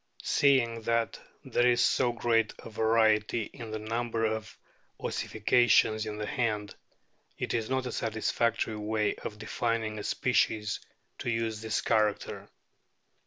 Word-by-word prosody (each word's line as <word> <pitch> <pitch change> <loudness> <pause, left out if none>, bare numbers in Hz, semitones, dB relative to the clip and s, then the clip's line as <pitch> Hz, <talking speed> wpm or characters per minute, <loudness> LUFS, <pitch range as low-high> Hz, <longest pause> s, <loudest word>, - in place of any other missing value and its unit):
Seeing 120 -5 +3
that 115 0 0 0.3
there 120 0 +2
is 120 -1 +3
so 125 -2 +3
great 115 -2 +1
a 115 - -11
variety 110 0 +2
in 115 -4 -8
the 110 - -3
number 115 +1 -2
of 110 0 -3 0.4
ossifications 110 -1 +2
in 105 -1 -5
the 105 - -3
hand, 105 -4 -1 0.6
it - - -3
is 115 -1 -1
not 130 0 0
a 125 - -3
satisfactory 110 0 0
way 105 0 0
of 105 - -7
defining 110 0 -2
a - - -5
species 105 -1 +1 0.4
to - - -3
use 115 -2 -1
this 110 0 -1
character. 110 -2 0
110 Hz, 135 wpm, -29 LUFS, 110-115 Hz, 0.6 s, Seeing